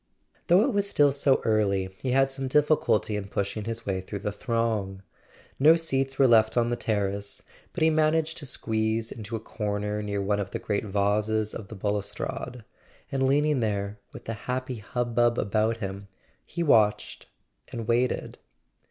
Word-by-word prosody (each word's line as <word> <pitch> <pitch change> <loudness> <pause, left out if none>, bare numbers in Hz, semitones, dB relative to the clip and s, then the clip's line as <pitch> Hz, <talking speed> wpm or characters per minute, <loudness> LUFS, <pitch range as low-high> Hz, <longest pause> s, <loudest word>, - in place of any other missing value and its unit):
Though 180 +5 +6
it 265 0 0
was 200 0 +1
still 145 -6 +4
so 140 -1 +2
early 100 -4 +1
he 130 - -3
had 135 +1 +3
some 135 0 -3
difficulty 145 -6 +2
in 100 -1 -4
pushing 100 +2 -3
his 115 0 -4
way 95 -2 -1
through 100 +2 -6
the 105 - 0
throng. 105 -3 -2 0.6
No 155 +4 +7
seats 135 -5 0
were 135 - +5
left 110 -1 +4
on 120 0 +2
the - - +1
terrace, 100 -3 -2 0.3
but - - -2
he 160 - +5
managed 155 +1 +1
to 145 - -7
squeeze 110 -1 -1
into 110 0 -6
a - - -3
corner 105 -1 -3
near 100 -1 -3
one 100 +1 0
of 100 -2 -3
the 115 - -3
great 110 -2 -2
vases 105 +2 0
of 105 - -7
the 110 - -9
balustrade; 105 +4 -4 0.5
and 135 -1 +1
leaning 145 +1 +2
there, 100 -2 -2
with - - -11
the 115 - -3 0.2
happy 130 0 -2
hubbub 120 +2 0
about 110 +2 +1
him, 100 -2 -6 0.4
he 170 - -3
watched 110 -9 +2 0.4
and 115 -2 -5
waited. 120 +1 0
110 Hz, 170 wpm, -27 LUFS, 105-135 Hz, 0.6 s, No